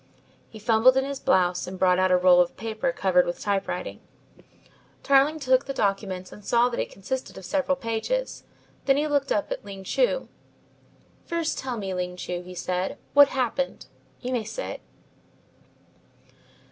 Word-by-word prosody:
He 220 - -11
fumbled 225 +4 +4
in 265 - +2
his 280 -1 -4
blouse 180 -1 +2
and 185 +1 -6
brought 180 0 +3
out 185 0 +3
a 180 - +5
roll 180 0 +6
of 175 - -1
paper 225 +4 -2
covered 185 -6 +3
with 175 - -4
typewriting. 200 - -2 1.0
Tarling 280 +3 +4
took 260 -1 +2
the 275 - -5
documents 195 -3 -1
and 210 - -12
saw 240 +4 +3
that 235 - -4
it - - -2
consisted 255 +7 -5
of 190 - -9
several 280 +2 0
pages. 270 - -3 0.4
Then 270 0 +4
he 295 - +1
looked 285 -2 0
up 205 - 0
at - - -4
Ling 195 -1 -9
Chu. - - 0 1.0
"First 335 -1 -1
tell 255 -3 -4
me, 195 -3 -4
Ling 180 0 -3
Chu," 175 0 -4
he 180 0 -11
said, 180 +1 -2 0.2
"what 285 0 +8
happened? 265 0 -2 0.4
You 250 - -4
may 240 -3 0
sit." - - -6
225 Hz, 165 wpm, -25 LUFS, 185-270 Hz, 1.0 s, what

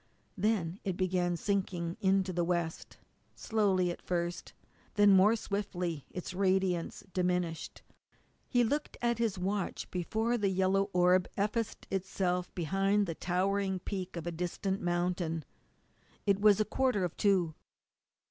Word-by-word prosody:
Then 195 -3 0
it 190 -3 -2
began 180 -2 +1
sinking 180 -3 -1
into 190 -1 +2
the 175 0 +1
west; 170 -2 -2 0.4
slowly 195 -5 +1
at - - -8
first, 175 -1 -3
and - - -34
then 205 -1 +6
more 205 +4 +6
swiftly, 180 -8 -3
its 180 0 -6
radiance 185 -2 0
diminished. 180 -3 -1 0.6
He 245 -2 +3
looked 290 +6 -1
at 235 -1 0
his 225 -5 0
watch 195 +1 -2
before 220 +7 0
the 200 -2 +2
yellow 190 +1 +2
orb 180 0 +4
effaced 210 +2 -1
itself 180 -1 -1
behind 195 +4 +1
the 170 - -3
towering 190 +3 0
peak 185 0 -5
of 170 - -5
a 175 - -2
distant 180 +3 -2
mountain. 175 -3 -1 0.8
It 200 -1 +2
was 210 -1 +6
a 215 - +3
quarter 250 -3 +1
of 175 - -2
two. 185 -6 +2
185 Hz, 140 wpm, -32 LUFS, 175-200 Hz, 0.8 s, then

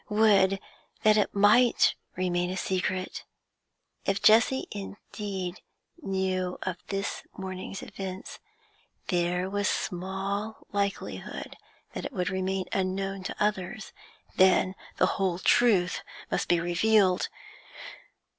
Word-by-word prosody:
Would 205 -3 +4 0.4
that 215 0 +6
it 210 -1 +1
might 210 +5 +5 0.2
remain 180 -1 0
a 185 - -3
secret! 185 0 -2 0.8
If 195 0 0
Jessie 230 +4 +5
indeed 200 -2 -6 0.4
knew 190 -4 -1
of 185 -2 -3
this 195 0 -3 0.2
morning's 190 0 -6
events, 190 -1 -7 0.7
there 180 0 +1
was 205 +1 0
small 195 +3 -3
likelihood 200 -1 -3 0.4
that - - -5
it - - -5
would 180 -4 -1
remain 190 0 -1
unknown 195 0 -1
to - - -3
others; 210 +1 -1 0.4
then 185 0 +5 0.2
the - - +5 0.2
whole 185 -3 +1
truth 195 -3 +3 0.3
must - - 0
be 175 - +3
revealed. 185 +2 +3
190 Hz, 110 wpm, -28 LUFS, 185-205 Hz, 0.8 s, that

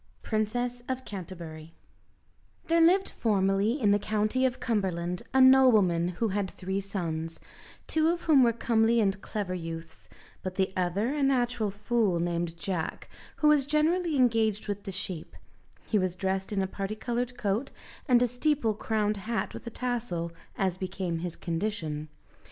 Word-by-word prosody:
Princess 240 +3 -1
of 260 0 -3
Canterbury 165 -4 -8 0.9
There 335 0 +3
lived 370 +4 +5
formerly 200 +3 +1
in 210 -5 +3
the 205 - +4
County 215 +5 +1
of 255 - -5
Cumberland 180 -6 -1
a 265 - +3
nobleman 225 -10 +6
who 230 - +1
had 200 -1 -1
three 190 +2 -3
sons, 165 -5 -4 0.5
two 315 0 +2
of 345 +1 0
whom 300 -5 +5
were 240 -2 +5
comely 230 0 +2
and 200 -2 +1
clever 200 -3 -3
youths, 165 -2 -7 0.3
but 185 -1 -5
the 190 0 0
other 185 +8 0
a 295 - -2
natural 245 -5 +1
fool, 205 -2 0
named 170 -1 -2
Jack, 170 -1 -4 0.3
who 305 - +2
was 290 -3 +4
generally 315 +3 +2
engaged 225 -5 +2
with 205 0 -4
the 195 - -4
sheep: 185 -3 -5 0.5
he 215 - +1
was 185 -2 -1
dressed 190 +1 -2
in 195 -2 +1
a - - -1
parti 195 +2 -4
coloured 245 +2 -3
coat, 215 +4 -1 0.4
and 250 -2 +5
a - - +3
steeple 245 -1 +1
crowned 210 0 0
hat 220 +4 -3
with - - -9
a - - -1
tassel, 230 -9 -2 0.3
as 185 -2 0
became 185 -3 -3
his 175 0 -4
condition. 165 -4 -3
210 Hz, 160 wpm, -28 LUFS, 185-245 Hz, 0.9 s, nobleman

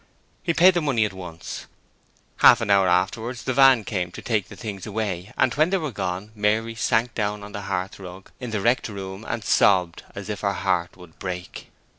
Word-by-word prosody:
He 170 -3 -1
paid 185 +2 +7
the 175 - +1
money 130 -8 +2
at 100 - -4
once; 90 -3 -8 0.7
half - - +7
an 100 - -1
hour 100 -1 +5
afterwards 110 +7 0
the 130 - -1
van 135 -3 +6
came 90 -4 -3
to - - -8
take 110 -6 0
the - - -11
things 100 -4 -6
away, 100 -3 -3
and - - +3
when 155 +4 +3
they 195 - +2
were 155 -6 -3
gone, 95 0 -4
Mary 110 +2 0
sank 115 +1 0
down 105 -1 -2
on 105 - -9
the 100 0 -6
hearthrug 95 0 -5
in 125 -2 -5
the 105 -3 -2
wrecked 120 +2 +1
room 95 0 -7
and 115 -1 -3
sobbed 90 -4 +3
as 100 0 -7
if 105 -2 -4
her 100 -1 0
heart 90 -1 -1
would 90 -3 -16
break. 90 -1 -6
105 Hz, 205 wpm, -24 LUFS, 95-115 Hz, 0.7 s, paid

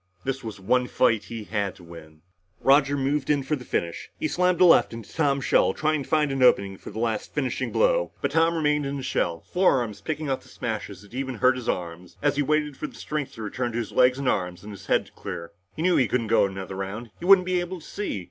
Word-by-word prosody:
This 135 0 -3
was 110 -3 -7
one 125 +6 +1
fight 110 -5 +2
he 115 -2 -6
had 100 -2 -2
to 90 - -16
win. 80 -2 -13 0.4
Roger 140 +1 +4
moved 140 +1 -1
in 145 -2 +2
for 150 +3 0
the 130 - -9
finish. 85 -7 -3
He - - 0
slammed 180 +3 +1
a 185 - +7
left 165 - +5
into 115 -2 -9
Tom's 140 -4 +1
shell, - - +3
trying 155 -1 0
to - - -9
find 150 -2 +2
an 135 -1 -2
opening 100 -6 +4
for - - -9
the - - -9
last 110 -1 -2
finishing 135 -4 -1
blow. - - +2
But 140 - -1
Tom 165 +2 +3
remained 150 -2 +1
in 140 +1 -3
his 135 - -5
shell, 85 -1 -1
forearms 125 - +1
picking 155 +6 -3
off 135 -1 -1
the - - -19
smashes 105 -5 -5
that 105 - -18
even 130 0 -3
hurt 130 +3 +3
his 125 -2 -5
arms, 85 0 -4
as 145 -1 +1
he 145 - +1
waited 150 -1 0
for 150 - -4
the - - -14
strength 150 -3 -4
to 110 - -7
return 120 +3 -3
to - - -2
his 115 -2 -3
legs 125 0 +4
and 140 -1 -3
arms 90 -6 -1
and 105 - -8
his 95 - -12
head - - +2
to - - -19
clear. 90 -4 -7 0.2
He 160 - -3
knew 180 0 +4
that - - +5
he 130 - +2
couldn't 120 -2 0
go 110 -2 +3
another 95 0 -7
round. 105 +4 -5
He - - -6
wouldn't 190 -1 +7
be 180 -1 +1
able 175 +1 -4
to 155 - -15
see. 205 - -4
130 Hz, 260 wpm, -25 LUFS, 105-150 Hz, 0.4 s, a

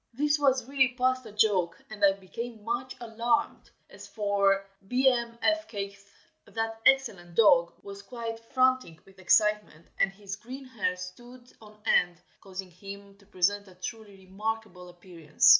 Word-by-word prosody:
This 295 +2 +2
was 265 -4 +3
really 265 -2 +2
past 255 -1 +1
a - - -10
joke, 205 -5 +2
and 210 -1 -6
I 195 -1 +7
became 215 +4 -8
much 240 +3 -3
alarmed. 235 +5 -1 0.2
As - - -12
for 200 -2 +1 0.2
Bmfkgth, 235 -5 0 0.4
that 225 0 -4
excellent 205 -11 +2
dog 170 -6 +5
was 200 0 -9
quite 230 +1 -6
frantic 255 -7 +1
with 195 0 -19
excitement, 210 -3 +2
and 195 - +3
his 195 0 -7
green 260 +5 -9
hair 215 -8 -1
stood 240 +8 -11
on 210 -1 -15
end, 175 -5 +3 0.2
causing 190 -1 -8
him 200 +2 -10
to 200 - -22
present 200 +2 +1
a 185 - -16
truly 195 +1 -8
remarkable 200 -2 -4
appearance. 175 -4 -1
210 Hz, 140 wpm, -28 LUFS, 195-240 Hz, 0.4 s, I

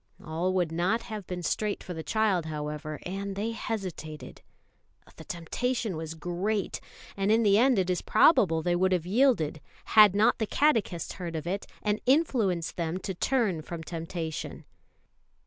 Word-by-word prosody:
All 165 +4 -1
would 175 -3 +1
not 180 +8 0
have 215 -5 -7
been 180 -1 -5
straight 210 +3 -1
for 180 - -6
the 160 - -5
child, 195 -3 +1
however, 150 0 -4
and 195 +2 -4
they 215 +3 -2
hesitated. 185 -9 -6 0.8
The - - -10
temptation 220 +5 -2
was 160 0 -5
great; 180 +5 -2 0.3
and 195 +1 +1
in 225 +1 +4
the 205 0 +5
end 255 -1 +4
it 185 -2 +2
is 180 -1 0
probable 185 - +4
they 175 +1 +1
would 185 +1 +2
have 175 -3 0
yielded, 190 - +2 0.3
had 210 -3 +8
not 210 +2 +3
the 220 - 0
catechist 225 - +1
heard 170 -3 -6
of 155 - -4
it, 195 +3 -3 0.2
and 210 0 0
influenced 235 - +2
them 170 0 -1
to 190 +1 -4
turn 205 -4 0
from 165 +1 -7
temptation. 165 -1 -5
185 Hz, 165 wpm, -28 LUFS, 165-215 Hz, 0.8 s, had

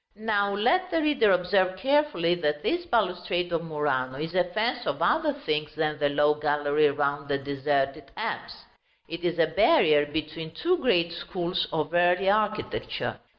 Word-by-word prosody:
Now 205 -2 0
let 360 - +1
the 330 - 0
reader 290 -9 +3
observe 185 +1 +1
carefully 265 - +1
that 150 -4 -2
this 350 +1 -1
balustrade 180 - -1
of 165 0 -1
Murano 145 -5 -2
is 160 +3 -5
a 180 -1 +2
fence 215 +7 -2
of - - -2
other 315 -2 +2
things 150 - -3
than 155 -1 -1
the 145 -1 +2
low 150 +1 +3
gallery 150 0 +1
round 140 0 -2
the 140 - 0
deserted 140 0 -2
apse. - - -5 0.4
It 170 +1 -7
is 170 -1 -1
a 165 - +4
barrier 160 - +3
between 160 +1 -5
two 355 - +1
great 170 - +2
schools 175 +1 -3
of 155 0 -2
early 180 +2 +3
architecture. 215 0 -2
170 Hz, 160 wpm, -26 LUFS, 150-205 Hz, 0.4 s, a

